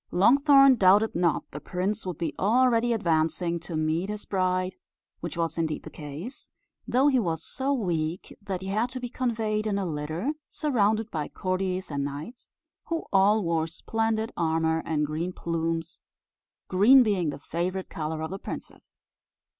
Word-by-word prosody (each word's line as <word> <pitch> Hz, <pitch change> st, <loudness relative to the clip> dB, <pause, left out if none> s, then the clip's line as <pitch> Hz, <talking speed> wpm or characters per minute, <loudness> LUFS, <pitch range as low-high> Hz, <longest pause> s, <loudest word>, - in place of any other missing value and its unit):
Longthorn 275 Hz, -, +6 dB
doubted 205 Hz, +3 st, +5 dB
not 170 Hz, -1 st, +1 dB
the 150 Hz, -, -6 dB
prince 190 Hz, +5 st, -3 dB
would 180 Hz, -4 st, -4 dB
be 170 Hz, -, -2 dB
already 240 Hz, +3 st, +3 dB
advancing 170 Hz, -3 st, +1 dB
to 165 Hz, 0 st, -7 dB
meet 160 Hz, +5 st, 0 dB
his 210 Hz, 0 st, -4 dB
bride, 185 Hz, -1 st, 0 dB, 0.5 s
which 170 Hz, 0 st, -6 dB
was 165 Hz, 0 st, -1 dB
indeed 160 Hz, -2 st, -1 dB
the 160 Hz, -, -9 dB
case; 155 Hz, -, -8 dB, 0.4 s
though 260 Hz, +3 st, +3 dB
he 265 Hz, -3 st, +4 dB
was 165 Hz, -7 st, -2 dB
so 270 Hz, +1 st, -2 dB
weak 175 Hz, -, -2 dB
that 195 Hz, -2 st, -4 dB
he 190 Hz, -, -5 dB
had 220 Hz, +5 st, 0 dB
to 255 Hz, +1 st, -6 dB
be 245 Hz, -1 st, -5 dB
conveyed 220 Hz, -4 st, -1 dB
in 200 Hz, -2 st, 0 dB
a 195 Hz, -, -1 dB
litter, 160 Hz, -, -2 dB, 0.2 s
surrounded 220 Hz, -6 st, +1 dB
by 150 Hz, -2 st, -2 dB
courtiers 185 Hz, -1 st, -2 dB
and 140 Hz, -1 st, -1 dB
knights, 145 Hz, -, -7 dB, 0.3 s
who 330 Hz, -1 st, -3 dB
all 200 Hz, +2 st, +4 dB
wore 165 Hz, -1 st, 0 dB
splendid 225 Hz, +6 st, -1 dB
armour 160 Hz, 0 st, +1 dB
and 150 Hz, -2 st, +1 dB
green 160 Hz, +5 st, -3 dB
plumes, 165 Hz, -1 st, -3 dB, 0.7 s
green 230 Hz, +8 st, +6 dB
being 195 Hz, -8 st, +1 dB
the -, -, -5 dB
favourite 175 Hz, +5 st, -3 dB
colour 155 Hz, 0 st, -4 dB
of 160 Hz, -, -4 dB
the 195 Hz, -, -5 dB
princess. -, -, -9 dB
185 Hz, 160 wpm, -27 LUFS, 165-220 Hz, 0.7 s, Longthorn